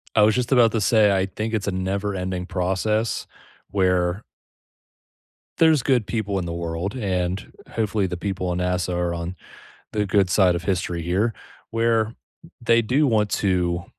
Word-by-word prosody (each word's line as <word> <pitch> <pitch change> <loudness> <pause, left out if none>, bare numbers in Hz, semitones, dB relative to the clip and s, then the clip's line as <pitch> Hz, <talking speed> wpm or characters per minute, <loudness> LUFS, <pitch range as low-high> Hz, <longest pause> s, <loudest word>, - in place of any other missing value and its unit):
I 105 - +5
was 105 0 +5
just 125 +1 -1
about 120 -4 +5
to 115 - 0
say 105 -1 +4
I 95 - +1
think 110 +3 -4
it's 105 -1 -1
a - - 0
never-ending 95 -1 -2
process 100 +5 -1 0.4
where 90 0 +1 1.4
There's 160 -5 +5
good 125 -7 +2
people 105 -3 -2
in 90 - -3
the 85 - -4
world, 85 +4 -3
and, 95 -5 -2 0.2
hopefully 105 -3 0
the 90 -1 -4
people 95 0 -3
on 90 0 -1
NASA 90 0 -1
are 85 0 0
on 85 +2 -5 0.6
the 105 -1 0
good 95 -1 +2
side 90 -3 +4
of 85 - -4
history 90 -2 -1
here, 95 +7 +1 0.4
where 115 0 +1 0.5
they 115 0 +3
do 135 +7 +2
want 105 -4 +2
to 90 -3 0
95 Hz, 165 wpm, -23 LUFS, 90-110 Hz, 1.4 s, I